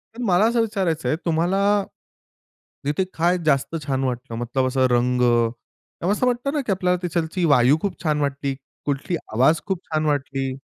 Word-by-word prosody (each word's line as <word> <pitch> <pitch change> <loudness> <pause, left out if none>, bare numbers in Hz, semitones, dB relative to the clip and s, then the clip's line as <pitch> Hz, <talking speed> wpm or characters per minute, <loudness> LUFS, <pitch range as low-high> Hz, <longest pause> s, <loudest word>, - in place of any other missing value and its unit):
पण 245 - -5
मला 190 0 +4
असं 230 +1 +2
विचारायचं 190 -8 -1
आहे 155 - +1
तुम्हाला, 195 +5 +2 1.0
तिथे 150 +6 +1
काय 175 +2 +3
जास्त 140 +2 +1
छान 135 -1 0
वाटलं 125 -2 -3
मतलब 130 +2 -1
असं 130 0 +2
रंग 125 +1 +2 0.8
ते 175 - +1
असं 210 +5 +1
वाटतं 250 +3 -1
ना 295 - 0
की 215 - -1
आपल्याला 180 -1 +1
तिथालची 170 +1 -1
वायू 140 -1 +5
खूप 195 -4 -4
छान 150 -2 +1
वाटली, 140 -1 -2 0.3
कुठली 145 +4 -1 0.2
आवाज 130 +8 +3
खूप 190 -3 -2
छान 155 0 0
वाटली. 135 -2 -1
160 Hz, 170 wpm, -22 LUFS, 135-190 Hz, 1.0 s, वायू